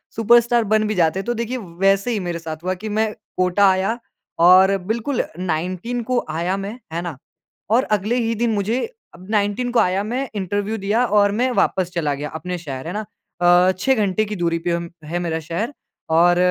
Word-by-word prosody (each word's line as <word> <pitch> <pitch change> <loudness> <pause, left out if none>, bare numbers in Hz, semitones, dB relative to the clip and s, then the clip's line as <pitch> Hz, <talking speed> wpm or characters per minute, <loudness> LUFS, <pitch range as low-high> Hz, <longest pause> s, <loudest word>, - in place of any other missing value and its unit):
Superstar 235 +1 +4
बन 215 0 +4
भी 215 - -1
जाते 170 +1 +2
हैं। - - -5
तो 240 - 0
देखिए 235 +2 -3
व 205 -7 -8
वैसे 195 +4 +3
ही 215 - 0
मेरे 170 -1 -3
साथ 160 -1 -7
हुआ 185 +1 0
कि 215 - -3
मैं 220 -1 +1 0.3
कोटा 185 +2 +3
आया 190 +5 +1 0.5
और 190 +2 +7
बिल्कुल 235 +4 -1
19 185 +7 -2
को 250 -1 +1
आया 170 +5 -1
मैं 205 +5 -6
है 170 - -2
ना? 170 -6 -6 0.5
और 240 +4 +4
अगले 210 +2 0
ही 230 -1 0
दिन 235 +1 0
मुझे 215 +5 0 0.4
अब 180 +2 -14
19 210 +4 0
को 240 - +3
आया 185 +2 +2
मैं 255 +4 -3
इंटरव्यू 205 +3 -2
दिया 215 +5 +1
और 205 -2 +3
मैं 255 - +3
वापस 180 -2 +1
चला 155 -4 0
गया 145 +1 -5
अपने 180 +3 -4
शहर, 140 -3 -6
है 175 - -4
ना? 215 0 -3 0.4
अ, 175 +1 +5
6 265 +6 +3
घंटे 200 +3 0
की 210 0 -5
दूरी 170 -2 0
पे 175 +1 -2
हम 170 0 -2 0.2
है 175 +3 -3
मेरा 165 -2 -2
शहर। 170 - -3 0.5
और 175 0 +5
195 Hz, 205 wpm, -21 LUFS, 175-225 Hz, 0.5 s, और